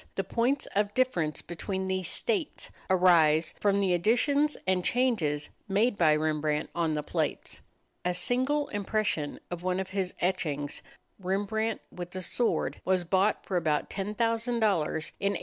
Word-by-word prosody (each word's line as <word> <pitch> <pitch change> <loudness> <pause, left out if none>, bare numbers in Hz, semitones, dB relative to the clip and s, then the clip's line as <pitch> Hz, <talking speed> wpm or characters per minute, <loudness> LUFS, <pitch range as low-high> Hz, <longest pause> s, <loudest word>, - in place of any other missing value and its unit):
The 195 - 0
points 240 +8 0
of 205 0 +1
difference 170 - 0
between 190 +3 -4
these 185 -1 -1
"states" 395 -10 -1 0.2
arise 170 -3 +4
from 200 -1 +2
the 190 -2 +2
additions 280 - +2
and 185 -1 +1
changes 190 - +1 0.2
made 210 +4 +2
by 155 -5 +4
Rembrandt 155 -1 0
on 165 -2 0
the 150 -1 -2
plates. - - -2 0.4
A 180 0 0
single 260 +8 +1
impression 205 -7 -1
of 175 -1 -4
one 185 +1 0
of 190 -1 -4
his 190 -2 -2
etchings, 150 -6 -1 0.4
"Rembrandt 205 +4 -1
with 180 0 -8
a 185 - -4
Sword," 240 +6 0
was 185 -1 +1
bought 190 +4 +1
for 185 - -1
about 155 -3 0
$10,000 - - -8
in 205 +2 -3
1893. 220 -6 0
190 Hz, 150 wpm, -29 LUFS, 170-220 Hz, 0.4 s, arise